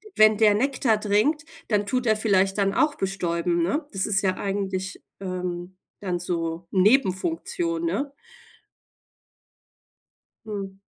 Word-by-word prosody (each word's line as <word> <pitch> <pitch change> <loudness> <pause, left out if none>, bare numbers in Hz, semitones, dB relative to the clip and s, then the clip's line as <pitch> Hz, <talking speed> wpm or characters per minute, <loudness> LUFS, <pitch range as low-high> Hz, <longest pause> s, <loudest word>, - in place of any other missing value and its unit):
wenn 215 0 +6
der 215 -1 +5
Nektar 250 -2 +1
trinkt, 215 +10 +1 0.2
dann 210 -2 +1
tut 250 +3 -1
er 220 - +4
vielleicht 195 -2 +2
dann 195 -1 +2
auch 300 -1 +2
bestäuben, 175 -3 -1
ne? 285 - 0
Das 195 -2 -1
ist 210 -2 +1
ja 185 -1 +1
eigentlich, 195 -1 -3 0.2
ähm, 180 -1 -4 0.2
dann 180 -3 -2
so 170 -1 -3
Nebenfunktion, 275 - +1
ne? 285 -4 -1 2.3
Mhm. 195 -3 -6
200 Hz, 120 wpm, -25 LUFS, 185-225 Hz, 2.3 s, wenn